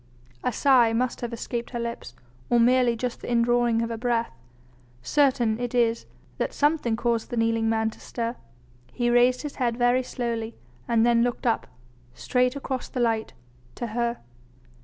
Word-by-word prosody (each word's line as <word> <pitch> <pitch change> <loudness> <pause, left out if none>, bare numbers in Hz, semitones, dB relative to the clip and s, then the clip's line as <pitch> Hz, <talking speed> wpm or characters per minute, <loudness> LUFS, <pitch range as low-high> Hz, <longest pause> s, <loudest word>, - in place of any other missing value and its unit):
A - - +1
sigh 245 -2 +4
must 245 +2 -1
have 240 -1 -3
escaped 235 +1 -4
her 240 - -4
lips, 235 - -5 0.3
or 240 - +4
merely 245 0 +4
just 245 +1 -4
the - - -5
indrawing 235 -1 +2
of 230 - -3
her 230 - -3
breath; 235 -1 0 0.7
certain 255 - +2
it 245 0 -3
is 230 -1 +1 0.3
that - - -1
something 290 -6 +1
caused 235 -1 -1
the 240 - -4
kneeling 225 0 +1
man 220 0 +1
to - - -16
stir. 235 0 -4 0.6
He 240 -1 0
raised 245 +2 +4
his 295 - -6
head 240 -3 0
very 245 +1 +3
slowly, 235 -3 -4 0.3
and 230 -1 +3
then 235 -1 +4
looked 245 +1 -1
up 230 - +1 0.5
straight 250 +1 +1
across 265 -2 -4
the 255 - -4
light 225 -2 0 0.4
to - - -4
her. 235 0 -1
240 Hz, 170 wpm, -25 LUFS, 230-250 Hz, 0.7 s, sigh